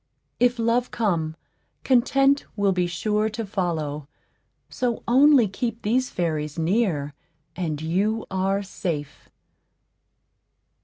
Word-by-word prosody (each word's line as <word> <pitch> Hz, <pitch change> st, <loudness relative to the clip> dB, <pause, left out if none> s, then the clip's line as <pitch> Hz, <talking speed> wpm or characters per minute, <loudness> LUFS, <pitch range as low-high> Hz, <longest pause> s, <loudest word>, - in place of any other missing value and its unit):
If 245 Hz, 0 st, +3 dB
Love 235 Hz, +2 st, +1 dB
come, 170 Hz, -8 st, -1 dB, 0.5 s
Content 270 Hz, +2 st, +3 dB
will 200 Hz, -2 st, +2 dB
be 180 Hz, -1 st, +1 dB
sure 210 Hz, +5 st, 0 dB
to 220 Hz, +1 st, -5 dB
follow; 160 Hz, -7 st, -3 dB, 0.6 s
so 245 Hz, -2 st, -2 dB
only 265 Hz, -1 st, +6 dB
keep 230 Hz, +4 st, -4 dB
these 250 Hz, +5 st, +1 dB
fairies 155 Hz, -3 st, -2 dB
near, 165 Hz, -5 st, 0 dB, 0.4 s
and 160 Hz, -5 st, -3 dB
you 195 Hz, +8 st, 0 dB
are 195 Hz, +1 st, 0 dB
safe. 155 Hz, -7 st, -5 dB
200 Hz, 105 wpm, -24 LUFS, 165-235 Hz, 0.6 s, only